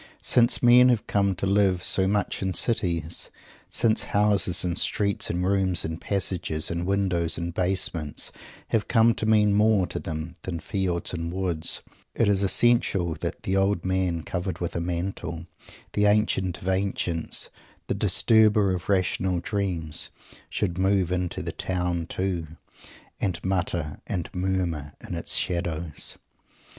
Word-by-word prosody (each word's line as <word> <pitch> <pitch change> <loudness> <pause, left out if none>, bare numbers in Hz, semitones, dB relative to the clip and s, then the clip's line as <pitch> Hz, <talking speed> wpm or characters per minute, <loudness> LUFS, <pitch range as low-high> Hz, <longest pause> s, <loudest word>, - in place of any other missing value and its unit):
Since 120 0 +4
men 125 +1 +7
have 120 -4 +1
come 100 -2 +1
to 95 - -2
live 95 -2 +2
so 95 0 +2
much 100 0 -1
in 95 -2 -2
cities; 85 -8 0 0.4
since 110 -1 +2
houses 100 -4 +2
and 90 -2 -1
streets 100 +1 0
and 90 +1 -1
rooms 95 -2 +1
and 80 +1 -5
passages 90 -6 -1
and 85 +1 -3
windows 90 -4 0
and 85 0 -4
basements 90 -4 -1 0.4
have 110 -2 0
come 115 0 +4
to 110 - -2
mean 105 -2 +4
more 105 -2 +3
to - - -4
them 80 +1 -5
than 85 -3 -4
fields 90 -2 -1
and 85 -1 -3
woods, 90 -3 -1 0.3
it 115 - +2
is 100 -1 +2
essential 100 -4 +2
that - - -5
"the 95 - -1
Old 95 -2 +1
Man 95 -3 0
covered 90 +2 -3
with 85 -1 -4
a 85 - -1
Mantle," 85 -1 -4 0.5
the 105 - +2
Ancient 95 -4 +1
of - - -6
Ancients, 95 -3 -1 0.3
the - - -1
Disturber 110 -3 +3
of 90 0 -5
Rational 95 -1 +1
Dreams, 90 -5 0 0.4
should 90 -3 -2
move 95 -2 +2
into 90 -1 -2
the - - -3
town, 90 -2 -2
too, 90 -4 -2 0.7
and 95 -4 -1
mutter 90 -5 -2
and 90 -4 -3
murmur 90 -6 -2
in - - -6
its - - -2
shadows! 85 -3 +1
95 Hz, 150 wpm, -25 LUFS, 85-100 Hz, 0.7 s, men